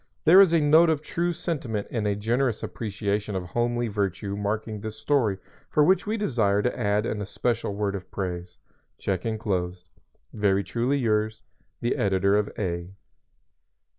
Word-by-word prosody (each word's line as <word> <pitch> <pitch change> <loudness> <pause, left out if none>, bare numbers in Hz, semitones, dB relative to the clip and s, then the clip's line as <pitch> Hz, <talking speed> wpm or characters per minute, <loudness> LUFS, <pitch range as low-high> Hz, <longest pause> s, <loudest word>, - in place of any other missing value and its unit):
There 180 +5 +9
is 190 -4 +6
a 165 - +4
note 155 +3 +5
of 155 -2 0
true 170 +3 -1
sentiment 145 - -3
and 110 -3 -1
a 100 - +1
generous 115 +2 0
appreciation 105 -1 -3
of 95 - -2
homely 120 +5 -1
virtue 100 -1 -2
marking 105 +1 -3
this 110 0 -5
story 115 -6 +1 0.3
for 150 - +4
which 190 +6 +3
we 220 +2 0
desire 110 - +1
to 125 - 0
add 105 -1 +1
an 110 -2 -2
especial 110 +1 -2
word 100 -1 -1
of 95 -2 -6
praise. 90 -2 -5 0.4
Check 95 +1 -2
enclosed._ 95 -5 -2 0.5
_"Very 100 -2 +2
truly 120 +7 0
yours, 110 -3 0 0.4
"The 120 - 0
Editor 100 0 +2
of 105 0 +1
A 90 -1 -3
105 Hz, 160 wpm, -26 LUFS, 100-125 Hz, 0.5 s, There